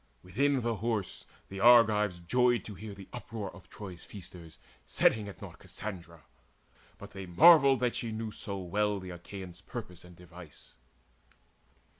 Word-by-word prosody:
Within 135 +9 +1
the 115 -2 -1
horse 110 -3 -3 0.2
the 95 - -8
Argives 105 -4 +5
joyed 120 +7 +2
to 105 - -7
hear 105 +1 -9
The 100 -1 -12
uproar 115 -5 -6
of 95 - -16
Troy's 95 -4 -9
feasters 90 -4 -12 0.3
setting 105 -2 +2
at 100 - -11
naught - - -10
Cassandra, 85 -6 -8 0.7
but - - -11
they 95 -1 -8
marvelled 140 - +7
that 125 -1 +1
she 115 - -3
knew 110 0 -4
So 100 -2 -6
well 100 +3 -1
the 95 -1 -8
Achaeans' 90 +1 -9
purpose 100 -6 -8
and 90 0 -14
device. 90 -2 -14
100 Hz, 150 wpm, -30 LUFS, 90-115 Hz, 0.7 s, marvelled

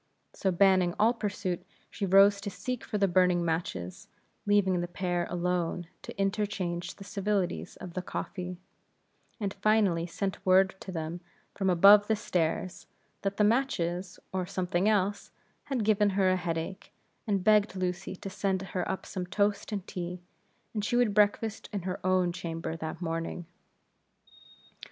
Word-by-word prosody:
So 195 - 0
banning 185 -1 +4
all 225 +3 +4
pursuit, 200 -5 -3 0.3
she 200 - -3
rose 200 +2 +6
to 200 - -4
seek 210 +6 -4
for 210 - -3
the 200 -1 +3
burning 180 -1 +3
matches, 160 - -3 0.4
leaving 190 -3 +3
the 175 - -2
pair 175 -1 -2
alone 175 0 -1 0.2
to - - -10
interchange 195 -3 -1
the 195 - -10
civilities 200 -2 -2
of 180 -2 -9
the 185 - -2
coffee; 180 0 -5 0.8
and 200 -2 -2
finally 195 -5 +2
sent 190 +3 -3
word 190 +1 +5
to 190 - -7
them, 165 0 -4 0.3
from 195 -2 0
above 200 +4 +7
stairs, 180 -1 -2 0.3
that 195 0 -2
the 210 - +4
matches, 185 -7 0 0.2
or 185 -1 -1
something 180 +2 0
else, 205 -1 0 0.4
had 270 -6 -1
given 210 -1 +4
her 190 -2 +4
a - - +3
headache, 170 0 -4 0.4
and 200 -3 +1
begged 210 0 +4
Lucy 180 0 -3
to 195 - -7
send 190 -1 -1
her 185 -2 -3
up 190 - -3
some 185 -2 -5
toast 205 +3 0
and 200 -3 -3
tea, 180 0 -5 0.5
for 215 - -1
she 215 +4 -1
would 240 -4 +3
breakfast 210 +1 +1
in 200 -4 -3
her 185 0 -4
own 185 -1 +2
chamber 165 -1 -4
that 160 +2 -5
morning. 165 +1 -3
185 Hz, 155 wpm, -29 LUFS, 175-205 Hz, 0.8 s, above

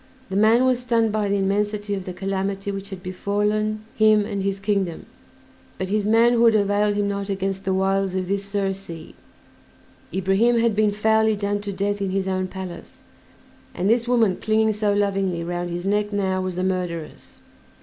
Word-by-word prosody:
The - - -2
man 220 +5 +4
was 255 -1 +2
stunned 230 -3 +1
by 210 -1 0
the 200 - +1
immensity 205 +1 -1
of 190 -2 -4
the 185 - -5
calamity 195 +1 -3
which 195 0 -6
had 190 -2 -8
befallen 210 +3 -1
him 215 -1 +4
and 200 -2 -3
his 195 0 -1
kingdom, 195 -4 -1 0.7
but 185 - -3
his 210 0 0
manhood 230 +1 +5
availed 205 0 +2
him 205 0 0
not 200 0 -3
against 195 0 -2
the 190 - +1
wiles 195 0 +1
of 185 -1 -2
this 200 +1 -1
Circe. 195 -4 -4 1.0
Ibrahim 195 +6 +2
had 230 -2 +2
been 210 0 +3
foully 220 +1 +2
done 205 0 -2
to 205 -1 -4
death 200 +1 -2
in 195 - -1
his 190 0 -1
own 185 0 -1
palace, 185 -2 -9 0.7
and 185 - -1
this 235 +2 +2
woman 225 -6 +3
clinging 220 0 +1
so 210 0 0
lovingly 195 -4 0
round 175 +1 -3
his 175 +1 -4
neck 210 +1 0
now 190 -2 0
was 185 -1 -3
the 180 - -2
murderess. 180 -4 -4
200 Hz, 180 wpm, -23 LUFS, 190-215 Hz, 1.0 s, manhood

